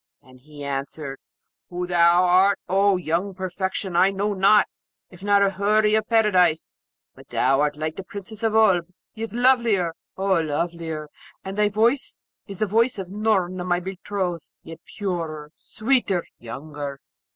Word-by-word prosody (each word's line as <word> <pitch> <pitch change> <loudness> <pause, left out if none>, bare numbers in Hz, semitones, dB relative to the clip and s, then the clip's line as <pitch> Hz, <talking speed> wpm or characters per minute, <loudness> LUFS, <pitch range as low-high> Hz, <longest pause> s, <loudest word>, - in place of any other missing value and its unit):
And 130 0 -18
he 145 +2 -12
answered, 140 0 -5 0.5
'Who 180 0 -3
thou 175 0 +4
art, 190 +2 +4
O 195 +1 +3
young 180 +3 -2
perfection, 190 0 -3
I 185 +3 +5
know 200 +2 -1
not, 200 +2 +5 0.5
if 180 0 -15
not 200 0 +3
a 195 - +2
Houri 210 +2 +2
of 215 0 +1
Paradise; 185 -8 +2 0.4
but - - -17
thou 135 +2 +2
art 150 0 0
like 155 +1 -3
the 195 - -5
Princess 200 +3 -9
of 220 -1 0
Oolb, 190 -6 +4 0.3
yet 225 -1 -5
lovelier, 235 -8 +2 0.2
oh 190 -3 +2
lovelier! 160 0 -3 0.4
And 190 0 -5
thy 210 0 +2
voice 230 +6 +1 0.3
is 200 -2 -8
the 215 - +1
voice 230 +4 +1
of 190 -2 -6
Noorna, 190 -4 0
my 175 -1 +1
betrothed; 185 -2 -4
yet 165 0 -10
purer, 165 -7 -4
sweeter, 215 -6 0 0.2
younger.' 140 +3 -7
185 Hz, 150 wpm, -23 LUFS, 165-205 Hz, 0.5 s, I